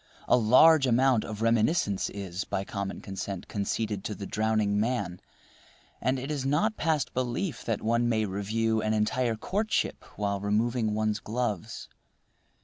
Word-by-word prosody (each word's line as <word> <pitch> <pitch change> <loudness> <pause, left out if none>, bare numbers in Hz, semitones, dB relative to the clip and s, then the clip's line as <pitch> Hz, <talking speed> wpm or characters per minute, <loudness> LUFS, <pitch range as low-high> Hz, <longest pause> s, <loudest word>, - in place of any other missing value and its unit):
A - - +5
large 130 +6 +6
amount 125 -1 +3
of 110 0 -5
reminiscence 115 - +2
is, 95 -1 -5
by 95 - -3
common 100 -1 -4
consent, 95 -1 -5
conceded 105 0 -2
to 105 - -3
the 100 - -6
drowning 110 -1 +1
man; 105 -6 -1 0.8
and 130 +1 +1
it 135 +3 -4
is 145 -3 -2
not 155 +11 +1
past 155 -5 0
belief 130 +4 -2
that 115 -3 -2
one 115 +2 +2
may 110 -2 +1
review 110 +3 0
an 110 0 0
entire 115 +2 +1
courtship 210 - -1
while 100 -1 -1
removing 110 +2 0
one's 110 0 0
gloves. 110 -2 -3
110 Hz, 145 wpm, -28 LUFS, 105-125 Hz, 0.8 s, large